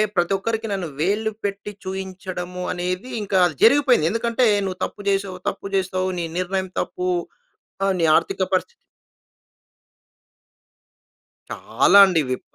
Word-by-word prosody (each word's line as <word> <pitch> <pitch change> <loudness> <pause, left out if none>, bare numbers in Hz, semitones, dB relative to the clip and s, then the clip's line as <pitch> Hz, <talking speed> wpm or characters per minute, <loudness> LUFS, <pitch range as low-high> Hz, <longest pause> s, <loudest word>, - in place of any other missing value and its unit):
ప్రతి 175 +2 +1
ఒక్కరికి 225 +2 -3
నన్ను 185 -4 -3
వేలు 210 +6 0
పెట్టి 200 +1 -4
చూయించడము 185 -1 -6
అనేది, 180 +7 -3
ఇంకా 195 -2 0
అది 160 - -1
జరిగిపోయింది. 250 - +5
ఎందుకంటే 235 +2 +1 0.2
నువ్వు 185 -1 -5
తప్పు 205 - -9
చేసావు, 195 -2 -1
తప్పు - - -7
చేసావు, 185 0 0
నీ 170 - -2
నిర్ణయం 190 +1 -2
తప్పు, 180 0 -4 0.8
ఆహ్, 195 -1 +2
నీ - - +2
ఆర్థిక 390 - -1
పరిస్థితి - - +2 2.9
చాలా 200 - +3
అండి 180 -4 +2
విప 130 - -3
190 Hz, 125 wpm, -22 LUFS, 180-205 Hz, 2.9 s, జరిగిపోయింది